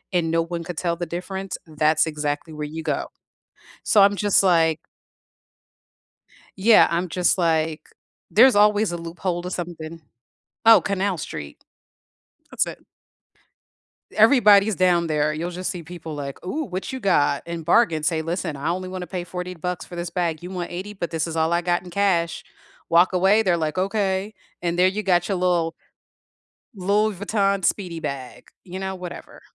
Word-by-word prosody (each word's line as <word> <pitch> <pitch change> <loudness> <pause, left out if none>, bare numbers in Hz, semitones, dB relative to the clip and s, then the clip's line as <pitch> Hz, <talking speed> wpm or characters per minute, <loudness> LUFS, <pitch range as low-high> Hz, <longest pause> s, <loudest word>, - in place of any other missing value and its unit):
and 165 -2 +1
no 165 0 +2
one 170 0 -5
could 170 -1 -7
tell 170 -1 -1
the 175 0 -5
difference, 190 +3 -5
that's 155 0 +2
exactly 150 0 -3
where 150 -1 -5
you 160 +2 -7
go. 150 -3 -2 0.8
So 205 - +4
I'm 200 +1 +5
just 205 -1 +2
like 165 -3 +3 1.8
Yeah, 215 +4 +6
I'm 175 +2 -1
just 180 +3 +1
like, 160 -2 0 0.4
there's 240 +1 +6
always 210 -2 +4
a - - -2
loophole 170 +1 -4
to 180 - -5
something. 170 -2 -6 0.7
Oh, 225 -5 +8
Canal 195 -1 -1
Street. 75 - -8 0.9
That's - - 0
it. - - -9 1.3
Everybody's 215 -3 +6
down 175 -2 +2
there. 150 -1 0
You'll 170 +3 -3
just 180 +1 -4
see 180 - -6
people, 165 -1 -8
like, 140 0 -7
"Ooh, 300 +12 -3
what 185 -1 -5
you 260 - -5
got?" 145 - +2
and 170 -1 -6
bargain. 170 -3 +3
Say, 160 +1 0
"Listen, 165 -2 -3
I 140 +3 -3
only 185 +1 -3
wanna 185 -1 -6
pay 180 +1 -4
40 180 +1 -6
bucks 180 +1 -4
for 175 - -11
this 175 0 -3
bag, 170 -2 -2
you 180 - -7
want 180 -2 -5
$80 190 +4 -6
but 175 -4 -4
this 165 0 -1
is 165 - -5
all 160 +1 +1
I 170 - +2
got 175 0 0
in 180 - -10
cash." 175 -3 0 0.5
Walk 175 +3 +4
away, 195 +4 +4
they're 180 -5 +2
like, 155 +1 -2
"Okay," 195 +1 -1 0.3
and 175 0 -1
there 185 +1 +5
you 205 +3 -3
got 175 -3 +2
your 195 - 0
little 175 -2 +1 1.0
Louis 205 +2 +1
Vuitton 200 0 0
speedy 175 -5 -1
bag, 140 -4 -6 0.2
you 185 0 -7
know, 190 0 -4
whatever. 180 -2 -9
175 Hz, 175 wpm, -23 LUFS, 165-190 Hz, 1.8 s, Oh